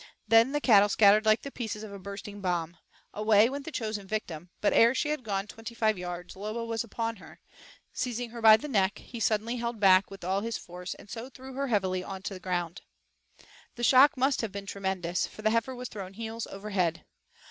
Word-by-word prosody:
Then 225 +4 +5
the 295 - 0
cattle 205 -7 +5
scattered 210 +1 +5
like 215 +1 +4
the 280 - -6
pieces 220 -4 -5
of 210 -2 -8
a 200 - -8
bursting 200 +1 -8
bomb. 175 -3 -2 0.4
Away 215 +2 +4
went 280 0 -5
the 325 - -6
chosen 215 -6 -4
victim, 180 -5 -4
but 210 - +2
ere 235 +3 +5
she 295 - 0
had 300 -2 -1
gone 200 -3 -2
twenty 225 +2 -9
five 220 -2 +2
yards 180 -1 -7
Lobo 215 +4 -4
was 230 -1 -2
upon 230 0 -4
her. - - -15 0.5
Seizing 245 -2 -3
her 235 -1 -8
by 220 -1 +9
the 300 - -7
neck, 200 -7 +1
he 235 - -9
suddenly 225 +2 0
held 235 -1 -3
back 190 -1 +5
with 195 -1 -11
all 190 +3 0
his 230 +1 -3
force 180 +1 -8
and - - -15
so 235 +2 -6
threw 265 0 -11
her 275 +1 -2
heavily 190 -5 0 0.2
to 205 - -4
the 185 - -8
ground. 175 -1 -3 0.9
The 240 - -6
shock 265 +3 +6
must 265 +2 +2
have 225 -3 -3
been 200 0 -6
tremendous, 190 -3 -2
for 215 - -12
the 215 - +3
heifer 230 +3 0
was 250 0 -6
thrown 195 -4 -8
heels 225 +2 -5
over 200 +2 -8
head. 175 -4 0
215 Hz, 215 wpm, -29 LUFS, 195-235 Hz, 0.9 s, by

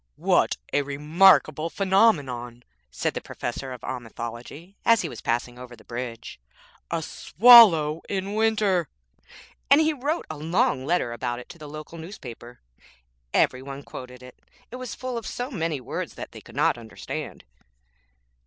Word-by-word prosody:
'What - - +2 0.2
a 145 - +3
remarkable 155 +2 +3
phenomenon,' 145 - +1 0.3
said - - -2
the - - -4
Professor 130 +2 -5
of 125 - -8
Omithology 120 - -7
as 230 -4 +4
he 165 - -3
was - - -9
passing 120 +1 -2
over 125 -1 -10
the - - -19
bridge. 120 -1 -7 0.5
'A 165 -1 -2
swallow 170 -7 +6
in 195 0 -3
winter!' 210 -6 +1 0.8
And 280 +3 +7
he 315 0 +3
wrote 295 +4 -2
a 155 - -7
long 165 - 0
letter 170 -8 0
about 120 0 -3
it 125 - -10
to 170 - -12
the 150 -1 -9
local 155 +2 -9
newspaper. 125 - -10 0.7
Every 130 - +2
one 140 +1 -8
quoted 125 -1 -10
it, 125 0 -14 0.3
it 250 - -6
was 255 -4 -6
full 255 -2 -4
of 230 - -9
so 245 +3 -4
many 165 - -2
words 125 - -5
that - - -8
they - - -11
could - - -15
not - - +2
understand. 110 -1 -7
155 Hz, 155 wpm, -25 LUFS, 125-200 Hz, 0.8 s, And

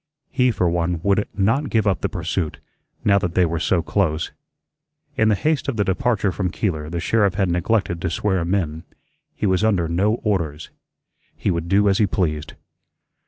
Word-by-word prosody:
He, 125 -1 +3
for 95 -6 +1
one, 85 0 0
would 100 +1 +2
not 115 +9 +1
give 110 -2 +1
up 100 -2 +1
the - - -1
pursuit, 85 -2 -3 0.5
now 100 -1 +5
that 90 -3 -3
they 90 - +4
were 85 0 -2
so 90 -1 +1
close. 80 -5 0 0.8
In 110 - +3
the 105 - +4
haste 155 +6 0
of 135 -5 -2
the 105 - +3
departure 105 0 0
from 90 0 -2
Keeler 80 -6 -2
the 85 +1 -3
sheriff 100 +1 +2
had 95 -3 +1
neglected 90 -1 0
to - - -1
swear 95 +2 0
him 85 +3 0
in. 80 -4 -2 0.5
He - - -2
was 95 +1 +2
under 95 -7 +2
no 95 +7 +1
orders. 80 -8 -2 0.7
He - - 0
would 85 -1 -3
do 100 +2 +4
as 95 -1 +3
he 105 - +4
pleased. 75 -5 -2
95 Hz, 190 wpm, -22 LUFS, 85-105 Hz, 0.8 s, now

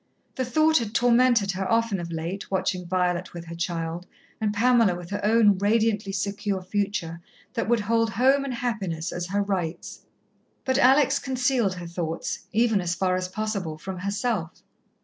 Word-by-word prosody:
The 260 - -2
thought 310 +5 +3
had 225 -1 -5
tormented 240 -3 +4
her 190 0 -3
often 230 -4 +1
of 170 -1 -6
late, 170 +4 -4
watching 185 -2 -1
Violet 180 0 -1
with 170 -1 -7
her 165 - -8
child, 170 0 -3 0.3
and 215 -1 +1
Pamela 230 -2 +3
with 175 +1 -9
her 205 - -3
own 210 -2 +4
radiantly 210 -1 +1
secure 200 0 -2
future 185 -4 -2 0.3
that 230 -3 -2
would 235 -2 +3
hold 230 +2 +1
home 265 +6 +3
and 270 -3 -3
happiness 195 -9 -3
as 175 0 -4
her 200 +2 0
rights. 180 -4 -4 0.6
But 260 0 +1
Alex 275 +2 +5
concealed 255 -6 0
her 175 -1 -7
thoughts, 170 -1 -4
even, 225 -2 +2
as 175 -1 -1
far 185 +1 +1
as 185 0 -2
possible, 195 -5 -3
from 185 +3 -6
herself. 200 -2 -2
200 Hz, 170 wpm, -25 LUFS, 180-230 Hz, 0.6 s, Alex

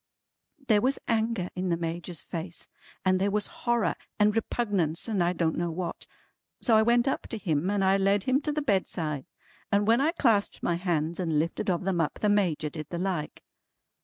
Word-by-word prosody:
There 210 -3 +4
was 265 +4 +2
anger 220 -5 0
in 185 0 -2
the 170 - +1
Major's 170 0 -4
face, 170 0 -6 0.4
and 185 0 +3
there 200 - +2
was 210 +1 0 0.2
horror 235 -7 +2 0.3
and 210 0 +4
repugnance 205 -8 0
and 205 -6 +1
I 175 - +2
don't 165 -2 0
know 175 0 -1
what. 175 +2 -4 0.5
So 230 - +3
I 220 - +6
went 235 +3 +3
up 270 - -1
to 225 - -5
him 170 -4 0
and 200 -1 +1
I 190 +1 +4
led 195 0 +2
him 260 +4 +2
to 300 - -1
the 300 0 -2
bedside, 165 - -1 0.4
and 205 +1 +3
when 230 +4 +4
I 310 +4 +3
clasped 225 - +1
my 175 - +1
hands 170 -2 -1
and 165 -4 0
lifted 165 +5 -1
of 180 0 0
them 185 -3 +1
up, 150 - -1
the 210 - 0
Major 175 -7 +1
did 155 -1 -7
the 175 - -4
like. 180 -4 -3
190 Hz, 200 wpm, -28 LUFS, 170-220 Hz, 0.5 s, I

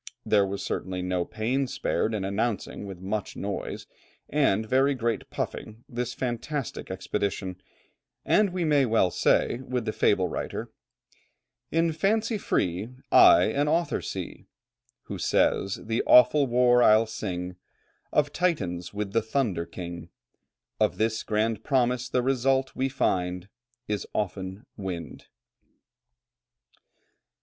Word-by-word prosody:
There 100 -2 +3
was 100 +1 -4
certainly 90 -1 -3
no 90 -1 -1
pains 125 +4 -1
spared 115 -5 0
in 100 -3 -2
announcing 100 0 -2
with 95 -3 -8
much 100 +2 -3
noise, 100 0 -4 0.5
and 120 -8 +2
very 135 +4 +3
great 115 -3 -2
puffing, 110 +2 -5
this 120 -2 -4
fantastic 130 +2 -4
expedition, 95 -2 -3 0.6
and 210 -1 +4
we 180 -1 -2
may 145 -4 +3
well 110 -5 +3
say 120 - +2
with 125 -3 -3
the 110 - -2
fable 95 -3 +2
writer, - - -5 1.0
"In 165 0 +2
fancy 215 +6 +1
free 95 - -1 0.2
I 355 -2 +8
an 145 +1 +1
author 165 +3 +1
see, - - -6 0.6
Who - - -7
says, 95 +1 +2
'The 115 +1 0
awful 140 +3 +6
war 125 0 +4
I'll 110 -1 +6
sing 90 -5 -5 0.5
Of 145 -1 +1
Titans 95 - -1
with 100 -1 -3
the 115 - +3
Thunder 110 -8 -1
King:' 85 -1 -7 0.7
Of - - +2
this 110 0 0
grand 110 0 -1
promise 125 -2 +1
the 125 -1 +1
result, 135 +1 +1
we 135 +1 0
find, 90 -7 -1 0.4
Is 105 -1 -2
often 95 0 -3
wind." 90 -5 -6
110 Hz, 125 wpm, -27 LUFS, 95-135 Hz, 1.0 s, I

